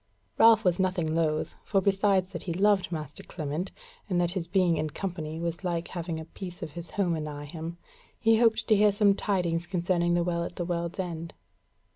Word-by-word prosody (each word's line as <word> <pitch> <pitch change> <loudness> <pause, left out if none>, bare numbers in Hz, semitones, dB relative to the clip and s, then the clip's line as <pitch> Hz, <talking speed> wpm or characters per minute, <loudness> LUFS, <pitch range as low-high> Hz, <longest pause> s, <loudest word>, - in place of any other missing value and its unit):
Ralph 225 -2 +7
was 180 0 +3
nothing 180 -4 +1
loth, 155 -2 0
for 195 - +2
besides 195 -1 +2
that 170 - -5
he 170 - -3
loved 195 0 +2
master 150 -3 -5
Clement, 155 +2 -4 0.4
and 180 -2 +1
that 175 -1 +1
his 175 -2 -3
being 180 -2 +3
in 155 - -1
company 160 -2 -4
was 170 +2 -3
like 170 -2 -2
having 170 -2 -4
a 160 - -7
piece 175 +2 -8
of 155 - -5
his 170 +2 -7
home 180 -5 0
anigh 150 -2 -5
him, 165 +3 -6 0.4
he 225 -1 +4
hoped 230 -2 +3
to 215 - +7
hear 210 0 +5
some 200 0 +4
tidings 175 -4 0
concerning 175 -1 +1
the 175 - +2
Well 170 -1 -1
at 175 - -6
the 175 - -3
World's 170 -1 -2
End. 170 -3 -4
175 Hz, 200 wpm, -28 LUFS, 165-190 Hz, 0.4 s, Ralph